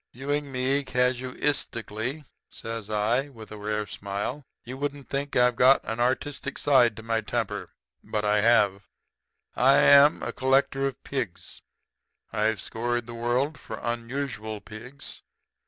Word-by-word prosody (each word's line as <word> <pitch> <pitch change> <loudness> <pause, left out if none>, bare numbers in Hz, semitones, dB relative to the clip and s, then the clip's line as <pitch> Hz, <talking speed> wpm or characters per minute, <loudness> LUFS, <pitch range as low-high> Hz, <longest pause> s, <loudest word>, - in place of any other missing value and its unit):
"'Viewing 145 +2 -2
me 135 +2 +1
casuistically,' 125 -1 -1 0.3
says 115 -2 -6
I, 115 +6 +1
with 110 -6 -12
a 105 - -7
rare 105 0 -2
smile, 100 +8 -4 0.2
'you 125 +2 -7
wouldn't 145 0 -4
think 140 +1 -2
that 125 - +5
I've 125 - -2
got 130 +3 +6
an 115 +2 -4
artistic 135 +3 -1
side 125 -6 +4
to 110 - -8
my 115 0 0
temper. 105 - -3 0.3
But 105 -1 -2
I 105 0 +3
have. 100 -4 +3 0.7
I'm 140 +2 +6
a - - -3
collector 135 +1 +2
of 135 - -7
pigs. 125 -10 -5 0.7
I've 110 -1 +1
scoured 120 +1 -2
the 120 - -8
world 125 +5 -1
for 110 - -7
unusual 120 -2 -4
pigs. 120 +8 -8
120 Hz, 140 wpm, -26 LUFS, 110-135 Hz, 0.7 s, got